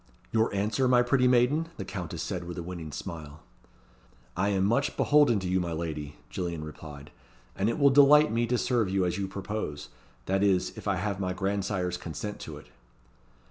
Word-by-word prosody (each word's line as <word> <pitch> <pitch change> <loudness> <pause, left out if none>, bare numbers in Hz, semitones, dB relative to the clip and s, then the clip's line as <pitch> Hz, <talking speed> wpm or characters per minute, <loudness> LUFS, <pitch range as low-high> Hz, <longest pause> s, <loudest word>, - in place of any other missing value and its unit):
"Your 110 0 +2
answer, 105 +6 0
my 125 -1 +5
pretty 125 +1 +3
maiden?" 125 +6 +3
the 95 - -5
Countess 90 -4 -5
said, 90 -3 -4
with 85 0 -7
a 85 - -4
winning 85 -3 -7
smile. 80 -3 -8 0.9
"I 100 - +1
am 95 -2 +1
much 140 +7 +1
beholden 145 -7 +4
to 95 - -3
you, 95 +1 +1
my 85 -2 -2
lady," 75 -3 -4 0.2
Gillian 85 -3 -3
replied, 75 -1 -10 0.4
"and 100 +3 +1
it 115 - -1
will 140 -2 +5
delight 145 +1 +7
me 115 +1 +1
to 125 +1 +1
serve 120 -5 +1
you 95 -1 +1
as 90 +2 -1
you 100 - -1
propose 95 - -5 0.4
that 95 +1 0
is, 95 -3 +2
if - - -8
I 100 - +2
have 100 +1 -2
my 90 -1 -1
grandsire's 95 -1 -1
consent 100 +5 -6
to - - -8
it." - - -13
95 Hz, 190 wpm, -28 LUFS, 85-115 Hz, 0.9 s, delight